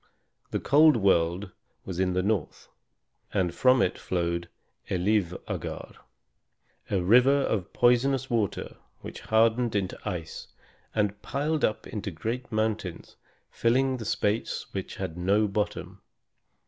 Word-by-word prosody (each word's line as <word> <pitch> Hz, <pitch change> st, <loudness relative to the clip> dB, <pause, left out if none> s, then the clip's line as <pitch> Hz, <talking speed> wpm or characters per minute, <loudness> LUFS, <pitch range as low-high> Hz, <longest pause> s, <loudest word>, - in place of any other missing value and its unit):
The -, -, -2 dB
cold 150 Hz, -1 st, +5 dB
world 95 Hz, -1 st, +1 dB, 0.3 s
was 90 Hz, -2 st, -5 dB
in 95 Hz, -1 st, +1 dB
the 90 Hz, 0 st, 0 dB
north, 100 Hz, -6 st, -2 dB, 0.6 s
and 90 Hz, -3 st, 0 dB
from 130 Hz, +3 st, +4 dB
it 90 Hz, -, -1 dB
flowed 85 Hz, -1 st, -2 dB, 0.4 s
Elivâgar, 95 Hz, -1 st, -2 dB, 0.9 s
a 95 Hz, -3 st, +1 dB
river 125 Hz, +8 st, +5 dB
of 100 Hz, -9 st, -1 dB
poisonous 125 Hz, +2 st, +3 dB
water 115 Hz, -6 st, -2 dB, 0.2 s
which -, -, -8 dB
hardened 115 Hz, +1 st, +2 dB
into 95 Hz, -2 st, -2 dB
ice 85 Hz, -6 st, -5 dB, 0.5 s
and 105 Hz, -2 st, 0 dB
piled 150 Hz, +2 st, -1 dB
up 110 Hz, -, 0 dB
into 105 Hz, -2 st, -5 dB
great 115 Hz, +9 st, -4 dB
mountains, 110 Hz, -5 st, -2 dB, 0.4 s
filling 130 Hz, +3 st, +1 dB
the 115 Hz, -, -7 dB
space 105 Hz, +2 st, -1 dB
which 95 Hz, -2 st, -5 dB
had 90 Hz, -3 st, -5 dB
no 100 Hz, +4 st, +2 dB
bottom. 100 Hz, -2 st, -3 dB
105 Hz, 120 wpm, -27 LUFS, 90-120 Hz, 0.9 s, cold